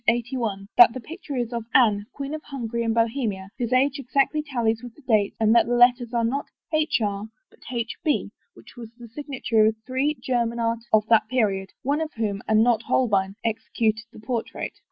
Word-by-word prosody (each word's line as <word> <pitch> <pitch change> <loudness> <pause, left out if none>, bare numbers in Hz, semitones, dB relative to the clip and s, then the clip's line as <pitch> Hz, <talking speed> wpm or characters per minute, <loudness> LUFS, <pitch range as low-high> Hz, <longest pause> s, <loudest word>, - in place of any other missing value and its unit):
81, 235 -4 -1
that 235 -1 +9
the - - -3
picture 315 +2 -8
is 240 -1 -2
of 235 -1 -3
Anne, 210 -5 +4
Queen 280 +1 -6
of 310 - -4
Hungary 235 -4 -4
and 225 - 0
Bohemia, 225 -4 -1
whose 240 -1 -2
age 265 +3 +2
exactly 275 +3 +1
tallies 235 -6 -1
with 245 -2 -10
the 300 - -19
dates, 210 -4 +2
and 220 0 +4
that 235 - +5
the 245 - +1
letters 245 -1 +4
are 235 -1 0
not 265 +5 -1 0.3
HR, 220 -10 0 0.2
but - - -23
HB, 245 +6 -2 0.2
which - - -16
was 235 -2 -9
the 240 -1 -11
signature 250 -4 0
of 220 - +1
three 270 +4 0
German 235 -2 -1
artists 230 0 -2
of 215 -1 +5
that 225 -2 +4
period, 200 -6 0
one 285 +4 0
of 315 -1 -4
whom, 205 -3 -2
and 220 0 +4
not 235 -2 +3
Holbein, 200 -6 +1
executed 220 0 -1
the - - -13
portrait. 230 +1 -4
235 Hz, 195 wpm, -24 LUFS, 220-260 Hz, 0.3 s, that